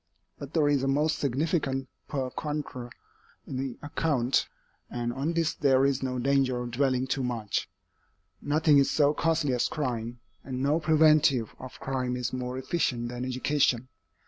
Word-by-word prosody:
But 140 +3 -8
there 155 -3 +4
is 145 -2 +2
a 135 - 0
most 150 +3 +1
significant 135 -1 0 0.2
per 130 -3 -2
contra 145 -5 -4 0.6
in 130 - -5
the 130 -2 -3
account, 145 -4 +1 0.4
and 120 0 -3
on 140 +6 -1
this 165 -2 +1
there 135 -1 +3
is 140 -1 +1
no 130 -1 -2
danger 130 -1 +2
of 120 0 -5
dwelling 130 0 +1
too 135 +1 -1
much. 115 -5 -2 0.7
Nothing 150 0 +4
is 140 - +3
so 145 -1 +3
costly 160 -4 +1
as 125 - +1
crime, 120 -5 -3 0.2
and 130 -1 -4
no 150 +3 +2
preventive 155 -6 +4
of 130 0 -10
crime 130 -2 -2
is 125 0 -3
more 125 0 -3
efficient 125 -4 -1
than 125 0 -5
education. 130 -1 +1
135 Hz, 160 wpm, -28 LUFS, 125-150 Hz, 0.7 s, there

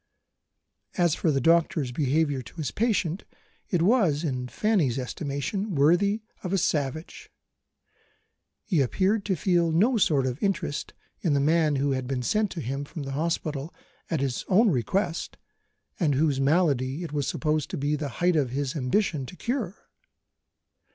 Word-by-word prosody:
As 175 -4 +3
for 165 - 0
the 140 -3 +2
doctor's 160 -3 +2
behaviour 145 +1 +1
to - - -14
his 155 -4 -3
patient, 195 -6 0 0.5
it 175 -4 +1
was, 180 - +3
in 130 -5 -2
Fanny's 170 - +1
estimation, 145 - -3
worthy 175 +9 +3 0.2
of 180 - -3
a 195 - +2
savage. 155 -1 -2 1.3
He 175 -9 +1
appeared 195 - +1
to 195 - +1
feel 170 0 +2
no 220 +10 +3
sort 150 -9 +3
of 130 +1 -3
interest 190 -7 -2 0.2
in 165 - +1
the - - +3
man 155 +1 +3
who 140 +1 +1
had 130 -1 -2
been 130 -1 -2
sent 210 - +1
to 165 - -5
him 135 +2 -3
from 145 +1 -7
the 135 - -5
hospital 155 0 -2 0.3
at 160 -5 -1
his 135 -3 -1
own 205 +3 +4
request, 170 - -1 0.6
and 150 -7 +2
whose 140 -1 +1
malady 140 -1 +1
it 160 - -6
was 145 -3 -1
supposed 155 -1 -1
to - - -4
be 145 +2 0
the 150 -1 -3
height 175 +7 +1
of 140 -5 +2
his 135 +2 -2
ambition 145 0 0
to - - -10
cure. 230 -4 -4
155 Hz, 160 wpm, -26 LUFS, 140-180 Hz, 1.3 s, own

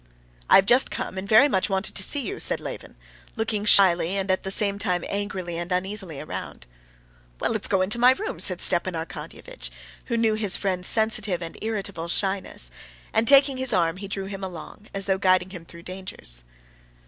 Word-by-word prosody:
"I - - +7
have 195 - +6
just 245 +5 +5
come, - - -5
and 190 +2 -6
very 225 +6 +7
much 190 -9 0
wanted 190 +1 -1
to - - -1
see 285 +9 +3
you," 395 +9 -5
said - - +1
Levin, - - -8 0.4
looking 220 -2 -2
shyly 185 -2 +5
and 190 0 0
at 185 - 0
the 190 - -5
same 200 0 0
time 180 -5 -1
angrily 190 -4 -4
and 175 +1 -6
uneasily 185 -4 -2
around. - - -7 0.7
"Well, - - -1
let's 220 -3 0
go 190 -2 +1
into 210 +5 -2
my 250 +2 +6
room," 430 - -6
said - - +1
Stepan - - +2
Arkadyevitch, - - -7 0.4
who 235 - -2
knew 225 -1 +2
his 215 -3 0
friend's 185 -2 -2
sensitive 215 -5 0
and 165 - -7
irritable 200 -6 -4
shyness, 190 - -2 0.4
and, 225 +1 +1
taking 275 0 +6
his 260 -1 +6
arm, 170 -1 +1
he 200 +1 -7
drew 195 0 -5
him 195 0 -7
along, 190 +3 -9
as 195 -1 -3
though 190 -1 0
guiding 185 -1 +2
him 175 -3 -10
through 170 0 -14
dangers. 180 - -3
195 Hz, 195 wpm, -24 LUFS, 185-220 Hz, 0.7 s, I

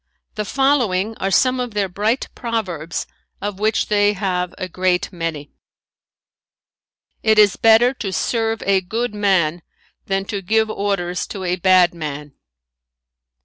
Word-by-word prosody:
The 210 -1 -3
following 225 -6 +1
are 195 - -1
some 255 +5 +3
of 245 -4 -4
their 200 -2 +1
bright 210 +7 -1
proverbs 185 -9 -3 0.3
of 205 -1 -5
which 215 +1 +1
they 205 0 +2
have 180 -3 -2
a 185 - -4
great 185 +1 0
many: 165 -4 -4 1.7
"It 220 -1 +3
is 205 -3 +6
better 225 +3 +5
to 205 -7 -5
serve 225 +2 -1
a 195 -1 +3
good 225 +5 -3
man 185 -5 +1 0.5
than 195 0 -1
to 200 -1 -4
give 220 +3 +1
orders 195 -4 -2
to 195 - -6
a 180 0 0
bad 185 -1 +4
man. 150 -3 -6
200 Hz, 140 wpm, -20 LUFS, 180-220 Hz, 1.7 s, is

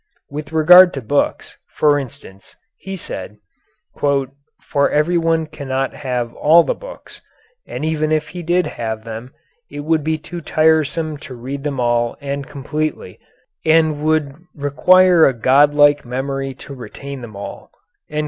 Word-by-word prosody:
With 150 +1 -6
regard 175 +3 +7
to 135 - -4
books, 140 +6 -1 0.2
for 145 -1 +4
instance, 95 -7 -11 0.2
he 195 0 -6
said, 105 - -7 0.6
"for 140 0 -1
everyone 165 +1 +1
cannot 135 -3 -3
have 125 -4 -3
all 165 +3 +5
the - - -1
books, - - -12 0.5
and - - -5
even 155 -1 -1
if 155 -1 0
he 180 - -7
did 175 +2 +1
have 110 -2 -5
them 115 +3 -8 0.4
it 145 - -7
would 155 0 0
be 160 +1 0
too 170 +3 -8
tiresome 155 0 +1
to 140 -3 -10
read 135 +4 -6
them 145 -3 -3
all 120 -1 0
and 140 -1 -5
completely, 150 -7 -4 0.4
and 160 0 +4
it - - -7
would 155 -3 +1 0.2
require 170 +4 +4
a 135 - +1
godlike 145 +4 +4
memory 135 +2 -4
to 140 - -11
retain 135 +1 -9
them 110 -4 -10
all." 100 - -8
145 Hz, 145 wpm, -18 LUFS, 135-155 Hz, 0.6 s, regard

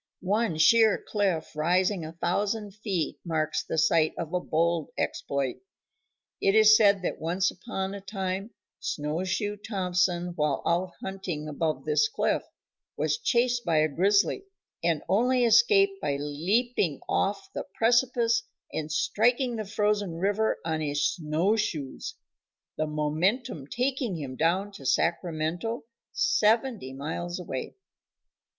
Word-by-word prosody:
One 205 -3 +1
sheer 220 +6 +5
cliff 190 -8 -2
rising 180 +4 +1
a 155 +1 -7
thousand 200 +5 -1
feet 200 -5 -3
marks 155 -2 -1
the - - -4
site 160 0 +3
of 165 0 -5
a 180 - +2
bold 170 -1 0
exploit. 140 -2 -2 0.8
It 195 - +3
is 215 0 +8
said 200 -3 +4
that - - -3
once 180 +4 +1
upon 195 -5 -5
a 200 - -7
time 195 0 -3 0.3
Snowshoe 185 +7 -2
Thompson, 180 -4 0
while 150 -3 0
out 175 +2 0
hunting 185 -6 -4
above 155 +1 -2
this 445 0 +3
cliff, 435 - 0 0.6
was - - 0
chased 245 - +1
by 165 -5 +1
a 155 0 +4
grizzly, 200 - +2 0.4
and 165 -3 +1
only 245 +4 +3
escaped 395 - +4
by 140 - 0
leaping 165 - 0
off 195 0 -1
the - - -4
precipice 235 0 +3 0.3
and 155 0 -3
striking 240 - +1
the 215 -1 -4
frozen 205 -3 0
river 205 +5 +1
on 160 -1 -1
his 145 -1 0
snow 165 +6 0
shoes, 155 -11 -3 0.6
the 155 - -1
momentum 155 - -1
taking 250 - -1
him 135 -4 -6
down 180 +7 +1
to 195 - -12
Sacramento, 170 - -1 0.3
seventy 220 - +1
miles 165 +6 -4
away. 135 -7 -5
185 Hz, 130 wpm, -27 LUFS, 160-220 Hz, 0.8 s, is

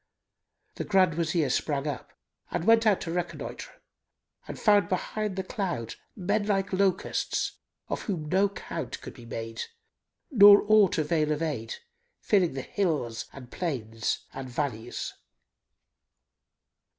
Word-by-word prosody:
The - - -2
Grand 190 -4 +3
Wazir 160 -3 0
sprang 140 +1 0
up 145 -3 -5 0.4
and - - -2
went 225 0 +5
out 205 -3 +3
to 165 - -4
reconnoitre 170 -3 -4 0.8
and - - -7
found 205 -5 +4
behind 205 +2 -2
the 190 - -2
cloud 185 - -3 0.2
men 205 +2 0
like 195 -2 0
locusts, 190 -1 0 0.3
of - - -3
whom 170 -7 -3
no 195 +5 +3
count 195 - -6
could - - -8
be 120 - -13
made 115 0 -5 0.7
nor 205 -4 +9
aught 215 -3 +5
avail 155 -1 +1
of 150 +2 0
aid, 130 -8 -3 0.4
filling 185 -7 +2
the 135 -1 -4
hills 150 - -1
and 125 -3 -12
plains 115 -10 -2
and 130 -1 -6
valleys. 120 -3 -3
170 Hz, 130 wpm, -28 LUFS, 135-200 Hz, 0.8 s, nor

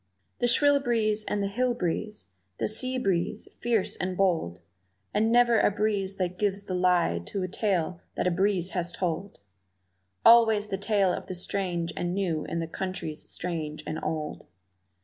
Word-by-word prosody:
The 245 - +2
shrill 285 +4 +5
breeze 220 -4 +1
and 205 -1 -1
the - - 0
hill 245 +4 0
breeze, 210 +2 -3 0.3
the - - 0
sea 255 +4 -1
breeze, 190 -8 -1
fierce 230 -4 +1
and 185 0 -3
bold, 165 - +1 0.5
And 220 +2 +2
never 240 -1 +5
a - - +4
breeze 200 -2 -1
that 180 -1 -3
gives 200 -1 0
the 190 - -5
lie 180 - +2
to 195 - -3
a - - -1
tale 180 -3 -1
that - - -1
a 180 - +3
breeze 185 0 +1
has 175 -2 -2
told; 185 +2 -3 0.8
Always 220 -3 +6
the 195 - -1
tale 200 -3 +2
of - - -5
the 185 - -5
strange 175 -2 -2
and 175 +1 -2
new 175 -6 -1
in 170 - -3
the 165 - -3
countries 185 -3 -5
strange 155 -3 -4
and 155 - -3
old. 155 -1 -4
190 Hz, 170 wpm, -27 LUFS, 175-215 Hz, 0.8 s, Always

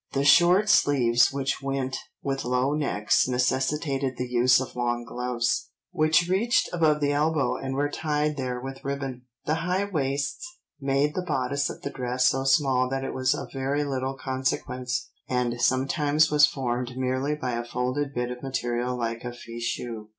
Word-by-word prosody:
The 140 +1 +1
short 175 +7 +6
sleeves 125 - +4
which 135 0 -2
went 135 -1 -2 0.3
with 135 -1 -2
low 125 +3 +1
necks 140 -10 +1
necessitated 130 +1 0
the 125 - -3
use 125 +1 +4
of 130 - -6
long 120 -1 -1
gloves, 125 -1 -1 0.2
which 155 +2 +3
reached 205 +6 +2
above 155 -3 +2
the 145 0 +2
elbow 150 0 +1
and 135 0 -4
were 145 +1 +1
tied 150 0 -1
there 130 -3 -3
with 135 +1 -8
ribbon. 135 -3 -4 0.2
The 150 - +1
high 180 +3 0
waists 140 - -2 0.4
made 140 +2 +1
the 185 - -2
bodice 140 -4 -1
of - - -9
the 140 - -3
dress 125 -1 -1
so 135 0 -1
small 135 -2 +3
that 135 0 -2
it 135 - -4
was 130 +2 +1
of - - -7
very 135 +2 -1
little 135 -1 -2
consequence, 130 -1 -2 0.2
and 120 -1 -1
sometimes 145 +4 +2
was 150 -1 +6
formed 125 -2 -3
merely 130 +3 0
by 130 -4 -3
a 120 0 -2
folded 130 +4 -2
bit 125 0 -1
of 125 - -7
material 125 -2 -2
like 115 -1 -3
a 120 - -4
fichu. 115 -2 -5
135 Hz, 170 wpm, -26 LUFS, 125-145 Hz, 0.4 s, short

